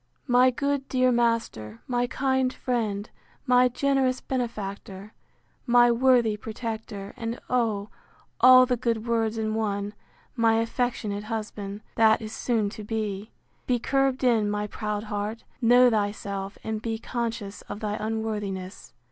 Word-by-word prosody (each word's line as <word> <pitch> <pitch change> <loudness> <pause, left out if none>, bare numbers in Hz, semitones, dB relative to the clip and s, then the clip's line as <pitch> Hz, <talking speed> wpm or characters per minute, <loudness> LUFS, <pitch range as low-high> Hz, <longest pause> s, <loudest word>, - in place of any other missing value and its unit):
My 250 0 +5
good 280 +1 -2
dear 255 -1 +3
master, 230 - 0
my 245 -1 0
kind 265 0 +1
friend, 220 -6 -2 0.4
my 250 0 +5
generous 260 0 +1
benefactor, 205 -5 -5 0.5
my 240 0 +6
worthy 240 -3 +3
protector, 220 -2 -6
and, 230 +1 -4
oh! 220 -5 0 0.5
all 255 0 +8
the 250 -1 0
good 230 -1 -1
words 225 -1 0
in 215 -1 -1
one, 205 -2 -2 0.4
my 230 -2 +3
affectionate 225 -3 -1
husband, 210 -2 -5 0.2
that 220 -1 +5
is 220 -1 -7
soon 220 -4 0
to 215 - -8
be—(be 215 +3 -4
curbed 270 +2 0
in, 225 -4 +3
my 210 0 -1
proud 210 0 -4
heart, 210 +1 -4 0.2
know 245 +2 +6
thy 210 -3 +2
self, 200 -1 -6
and 220 -1 -3
be 225 -1 -2
conscious 230 -4 -4
of 205 - -5
thy 210 -1 -2
unworthiness!) 210 - -4
225 Hz, 135 wpm, -26 LUFS, 210-245 Hz, 0.5 s, all